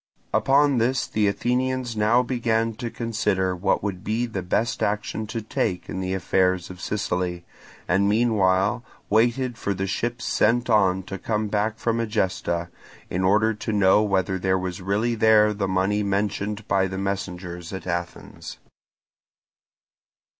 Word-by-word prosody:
Upon 140 -1 +3
this 125 +2 +1
the 105 -1 0
Athenians 125 +3 -1
now 110 +4 +3
began 115 -2 0
to 120 -2 -4
consider 100 -6 -1
what 95 +2 0
would 95 -3 -4
be 110 +3 0
the 110 -5 -4
best 110 +6 -1
action 105 +1 -2
to 110 0 -4
take 90 -4 -2
in 95 - -4
the 95 0 -2
affairs 95 -1 +1
of 90 0 -11
Sicily, 90 -4 -2 0.4
and 100 +3 +2
meanwhile 105 -1 +2 0.3
waited 120 +3 +2
for 100 - -1
the 95 +1 -2
ships 120 +5 -3
sent 120 +2 +2
on 95 -3 +3
to 95 +1 -7
come 105 -1 -1
back 110 +2 0
from 115 0 -1
Egesta, 90 -5 -1 0.4
in 90 +1 -1
order 105 +4 +3
to 110 +1 -4
know 100 -1 +4
whether 95 -2 0
there 95 +1 +1
was 90 -1 -4
really 105 +5 0
there 110 -1 +4
the 100 -1 -2
money 95 +3 +1
mentioned 100 +1 -2
by 95 -1 +2
the 95 0 -5
messengers 90 -3 -4
at 95 - -6
Athens. 85 -1 -5
105 Hz, 150 wpm, -24 LUFS, 95-115 Hz, 0.4 s, know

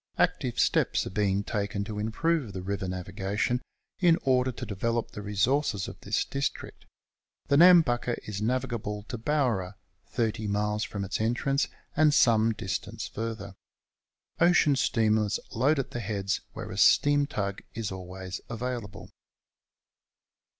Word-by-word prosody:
Active - - +1
steps - - +2
are - - -5
being 100 0 +1
taken 100 -1 -2
to 105 0 -5
improve 125 +3 0
the 95 -1 -5
river 95 0 -3
navigation, 95 +6 -2 0.4
in 170 -3 +5
order 130 -1 +2
to 125 - -7
develop 115 +3 -2
the 105 - -7
resources 105 +1 0
of - - -9
this - - 0
district. 140 0 -4 0.6
The 140 - +4
Nambucca 155 -9 +6
is 105 -1 -4
navigable 115 -3 -2
to 120 - -4
Bowra, 115 -9 0 0.3
30 110 -2 -1
miles 105 +1 0
from 100 -1 -4
its 100 +2 -3
entrance, 130 +5 +1 0.3
and 150 -1 +4
some 115 -3 +4
distance 95 -4 -4
further. 110 -3 -5 0.9
Ocean 170 -4 +5
steamers 110 -5 +2
load 135 +7 +2
at 135 - -2
the 120 - -4
heads, 100 -2 -2
wkere - - -6
a - - -7
steam 145 0 +5
tug 100 -7 -3
is 110 -3 -3
always 95 0 -7
available. 110 -5 -5
110 Hz, 135 wpm, -28 LUFS, 100-130 Hz, 0.9 s, Nambucca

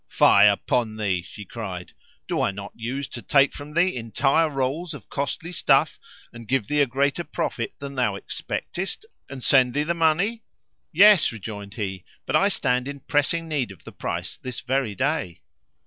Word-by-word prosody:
"Fie - - +6
upon 110 -3 +1
thee!" 95 -4 0
she 105 +4 -11
cried, 95 -5 -6 0.4
"Do - - 0
I - - +2
not 100 0 -7
use 130 +5 -4
to 120 - -7
take 140 +2 +3
from 150 +1 -9
thee 180 +2 +3
entire 135 +7 +1
rolls 150 +4 -2
of - - -13
costly 150 +4 -3
stuff, 165 - +2 0.3
and 115 -1 -11
give 130 -3 +1
thee 150 +6 +1
a 140 - +4
greater 140 +6 0
profit 115 -7 -3
than 140 0 -7
thou 125 -7 0
expectest, 190 - -5 0.2
and 135 -2 -8
send 130 -2 +4
thee 145 - +2
the 165 +3 0
money?" 170 +8 +1 0.5
"Yes," 200 +2 +7
rejoined 105 -2 -8
he; 95 -4 -4 0.2
"but 130 - -1
I 195 +6 +5
stand 125 -9 0
in 140 -1 -6
pressing 150 +4 0
need 145 -7 -1
of 95 - -13
the - - -10
price - - -4
this 130 -2 -6
very 130 -4 -1
day." 130 - -1
135 Hz, 180 wpm, -24 LUFS, 115-155 Hz, 0.5 s, Yes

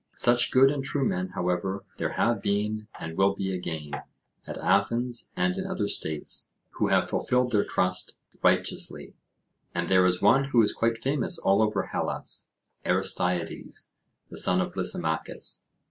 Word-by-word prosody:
Such 120 0 +4
good 135 +1 +5
and 140 -2 -3
true 135 0 -1
men, 90 +1 -1
however, 90 +2 -2
there - - -2
have 115 -4 +1
been, 105 +1 -1
and 80 0 -6
will 95 +1 +3
be 95 -1 -2
again, 80 -5 -5 0.6
at - - -6
Athens 120 +4 0
and 180 0 +1
in 190 0 -3
other 185 - -1
states, 80 -6 -1 0.2
who - - 0
have - - +2
fulfilled 125 0 +1
their 105 -3 +3
trust 90 0 -1 0.3
righteously; - - 0 0.6
and 85 0 -1
there 95 -1 +5
is 90 0 +1
one 135 +1 +4
who 125 -5 +4
is 105 - +3
quite 115 0 0
famous 135 +3 0
all 100 +2 +3
over 105 -3 +1
Hellas, - - -3 0.3
Aristeides, 90 -2 -1 0.4
the - - -6
son 90 - +5
of 90 - -2
Lysimachus. - - -1
100 Hz, 155 wpm, -27 LUFS, 90-125 Hz, 0.6 s, good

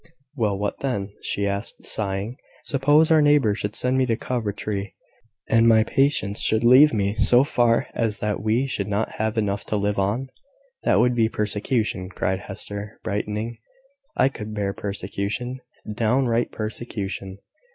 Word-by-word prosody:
"Well, 105 -6 0
what 105 +1 -3
then?" 105 -7 -2
she 100 - -1
asked, 100 +2 -3
sighing. 105 +3 -1 0.3
"Suppose 145 +4 +3
our 160 -1 +6
neighbours 145 -8 +3
should 105 +1 -3
send 130 +1 +2
me 130 - +2
to 115 - +1
Coventry, 105 -4 -3 0.5
and 115 0 +4
my 110 -1 +6
patients 120 -5 +1
should 110 +1 +2
leave 130 +5 +7
me 100 -2 0
so 125 +1 +6
far 120 -5 +2
as 110 -3 -1
that 105 -1 -2
we 110 +5 +1
should 105 -7 -3
not 105 +2 -1
have 110 +1 -1
enough 100 -2 -1
to 105 - -1
live 100 0 0
on?" 110 +7 -1 0.5
"That - - +2
would 125 0 +3
be 115 -2 +2
persecution," 105 -2 -1
cried 95 0 -2
Hester, 100 +1 -7
brightening. 105 +3 -3 0.6
"I 130 - +4
could 110 -4 -7
bear 100 -2 -1
persecution, 100 +6 -4 0.3
downright 120 +1 +1
persecution." 100 -3 -5
110 Hz, 150 wpm, -23 LUFS, 100-120 Hz, 0.6 s, leave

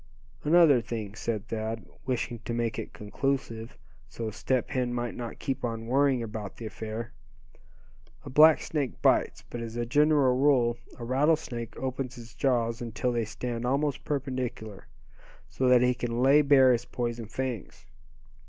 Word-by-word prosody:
"Another 150 -5 +6
thing," 110 -4 -5
said 110 -2 -3
Thad, 110 0 -3 0.2
wishing 120 -2 -2
to 120 - -2
make 115 -1 -1
it 110 - -6
conclusive, 115 +1 -3 0.3
so 115 -2 -5
Step 130 +3 -1
Hen 125 -2 -1
might 120 -1 -2
not 120 -2 -6
keep 135 -2 -3
on 115 -1 -3
worrying 130 0 +2
about 105 -3 -6
the 115 - -7
affair. 110 +1 -5 1.1
"A - - -6
black 155 +3 +7
snake 145 -5 -3
bites, - - +2
but 120 - -6
as 115 -1 -6
a 120 0 -1
general 145 0 +4
rule 125 -4 +3 0.2
a 120 - -7
rattlesnake 130 -3 0
opens 130 -1 -3
his 115 -2 -11
jaws 120 -3 0
until 120 +2 -2
they 120 -2 0
stand 115 +2 -4
almost 140 +3 0
perpendicular, 130 -7 -4 0.6
so 130 - -1
that 125 -1 +6
he 125 0 +3
can 120 0 -2
lay 140 +3 +6
bare 135 -3 +6
his 120 0 0
poison 120 -2 -4
fangs. 115 - -5
120 Hz, 155 wpm, -28 LUFS, 115-135 Hz, 1.1 s, black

